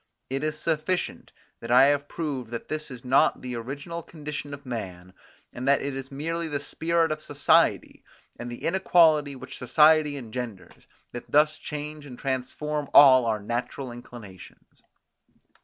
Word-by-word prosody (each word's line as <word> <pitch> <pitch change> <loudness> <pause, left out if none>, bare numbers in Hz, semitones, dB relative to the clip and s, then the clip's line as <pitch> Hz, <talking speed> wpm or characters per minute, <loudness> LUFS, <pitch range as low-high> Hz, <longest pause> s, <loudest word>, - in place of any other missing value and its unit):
It 135 +2 -2
is 155 0 -2
sufficient 165 +3 -2 0.3
that 115 - -9
I 125 +2 +7
have 145 +1 +2
proved 140 -9 -4
that 115 0 -7
this 155 0 -4
is 125 -1 -10
not 130 +2 +3
the 125 -1 -5
original 140 +8 -6
condition 150 -3 -7
of 140 0 -9
man, 90 -7 -6 0.4
and 125 +2 -5
that 140 0 +3
it 140 -1 -3
is 135 0 -7
merely 165 +4 -3
the 145 -2 -2
spirit 165 +2 0
of 155 0 -3
society, - - +2 0.4
and 120 0 -6
the 120 - -9
inequality 165 -5 +3
which 130 - -10
society 150 +3 +4
engenders, 115 -5 -8 0.2
that 120 - -8
thus 150 +1 +3
change 150 -1 -7
and 125 -3 -10
transform 140 +3 -3
all 130 -3 +8
our 110 -1 0
natural 120 +4 -4
inclinations. 120 -6 -13
140 Hz, 155 wpm, -26 LUFS, 125-155 Hz, 0.4 s, all